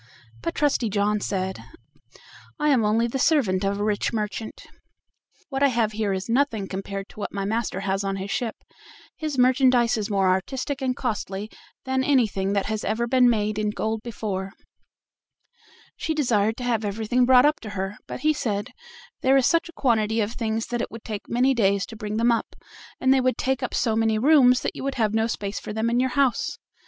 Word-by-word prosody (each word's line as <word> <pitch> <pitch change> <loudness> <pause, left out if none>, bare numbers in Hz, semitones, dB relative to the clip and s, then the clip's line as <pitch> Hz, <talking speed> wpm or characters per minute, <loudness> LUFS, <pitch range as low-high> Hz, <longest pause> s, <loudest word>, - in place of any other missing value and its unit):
But 165 - -3
Trusty 280 -6 +1
John 210 +1 +1
said: 190 -1 -3 1.0
"I 300 0 +2
am 260 -6 +4
only 220 +2 +2
the 235 +3 -3
servant 225 - +2
of 200 +1 0
a - - -1
rich 210 -1 0
merchant, 215 0 -4 0.8
what 270 -1 -3
I 280 - +6
have 230 -4 +1
here 215 -1 -1
is 190 0 -3
nothing 230 -5 +1
compared 195 +1 -5
to - - -14
what - - -4
my 200 -1 -3
master 215 -2 -2
has 195 0 -1
on 195 0 -1
his 195 +1 -5
ship; 235 -3 -2 0.6
his 310 -3 -4
merchandise 250 -2 +4
is 215 0 -3
more 195 -2 +2
artistic 260 +9 -1
and 255 -1 0
costly 210 -4 -4 0.3
than 260 0 0
anything 215 -8 +1
that 200 -1 0
has 215 0 -3
ever 235 +2 0
been 250 0 +4
made 215 -2 0
in 210 0 0
gold 220 +1 -2
before." 205 -4 -4 1.4
She 320 - -2
desired 225 -7 +1
to 250 - -6
have 235 -3 0
everything 220 +4 0
brought 255 0 +7
up 300 +1 +2
to 220 - -8
her, 195 0 -4
but - - -6
he 310 0 +3
said: 210 -8 -3 0.5
"There 265 +1 +4
is 265 - +3
such 335 +4 +2
a - - -12
quantity 225 -5 +1
of 210 0 0
things 225 -2 -2
that 240 -1 -1
it - - -3
would 230 0 -10
take 210 -3 -6
many 255 +3 +3
days 200 -5 +2
to 225 - -11
bring 215 -1 -4
them 235 +1 +3
up, 230 - -2 0.4
and 260 0 +4
they 265 - +3
would 255 0 +1
take 265 0 -1
up 255 - -3
so 225 -2 +1
many 225 -1 +2
rooms 255 0 +5
that - - -3
you - - -6
would 275 0 -2
have 220 -3 +1
no 225 0 +2
space 200 -3 -4
for - - -7
them 220 +2 0
in 240 - +2
your 260 +1 +2
house." 280 +2 +1
225 Hz, 210 wpm, -24 LUFS, 205-255 Hz, 1.4 s, brought